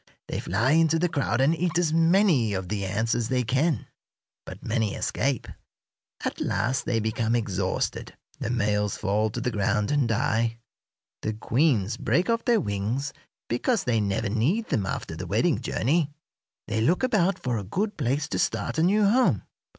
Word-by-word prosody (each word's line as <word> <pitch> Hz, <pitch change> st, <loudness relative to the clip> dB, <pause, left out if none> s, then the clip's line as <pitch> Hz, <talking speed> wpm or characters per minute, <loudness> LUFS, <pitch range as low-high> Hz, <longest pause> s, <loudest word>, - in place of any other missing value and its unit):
They -, -, -2 dB
fly 110 Hz, +9 st, +1 dB
into 165 Hz, 0 st, +4 dB
the 175 Hz, +2 st, +2 dB
crowd 140 Hz, -6 st, 0 dB
and 140 Hz, +4 st, +4 dB
eat 175 Hz, 0 st, -1 dB
as 165 Hz, -3 st, +1 dB
many 165 Hz, -, +3 dB
of 95 Hz, -1 st, -4 dB
the 100 Hz, -1 st, -2 dB
ants 110 Hz, +4 st, 0 dB
as 115 Hz, -2 st, -1 dB
they 130 Hz, -1 st, +1 dB
can. 135 Hz, -, 0 dB, 0.6 s
But -, -, -9 dB
many 110 Hz, -2 st, 0 dB
escape. 135 Hz, -1 st, -1 dB, 0.8 s
At -, -, -3 dB
last 130 Hz, +3 st, 0 dB
they 115 Hz, -, +1 dB
become 110 Hz, +1 st, 0 dB
exhausted. 95 Hz, -5 st, -2 dB, 0.2 s
The -, -, -3 dB
males 105 Hz, -4 st, 0 dB
fall 105 Hz, +2 st, 0 dB
to -, -, -5 dB
the 125 Hz, -, -1 dB
ground 105 Hz, +1 st, 0 dB
and 145 Hz, -4 st, +2 dB
die. 115 Hz, -1 st, 0 dB, 0.6 s
The 110 Hz, -, -2 dB
queens 115 Hz, -1 st, +1 dB
break 180 Hz, +7 st, +1 dB
off 230 Hz, 0 st, -1 dB
their 235 Hz, -2 st, +4 dB
wings, 110 Hz, -, -2 dB, 0.3 s
because 205 Hz, -, 0 dB
they 115 Hz, -3 st, +1 dB
never 100 Hz, +2 st, -1 dB
need 145 Hz, -, 0 dB
them 105 Hz, -10 st, 0 dB
after -, -, -4 dB
the -, -, -6 dB
wedding -, -, +1 dB
journey. 150 Hz, +4 st, +1 dB, 0.6 s
"They 110 Hz, +1 st, -1 dB
look 170 Hz, -, +2 dB
about 195 Hz, -7 st, +2 dB
for 120 Hz, -, -2 dB
a -, -, -5 dB
good 200 Hz, -, -2 dB
place 140 Hz, +1 st, -1 dB
to -, -, -2 dB
start 170 Hz, -1 st, -1 dB
a -, -, +3 dB
new 205 Hz, +5 st, +4 dB
home. 245 Hz, +5 st, +3 dB
125 Hz, 175 wpm, -26 LUFS, 110-165 Hz, 0.8 s, into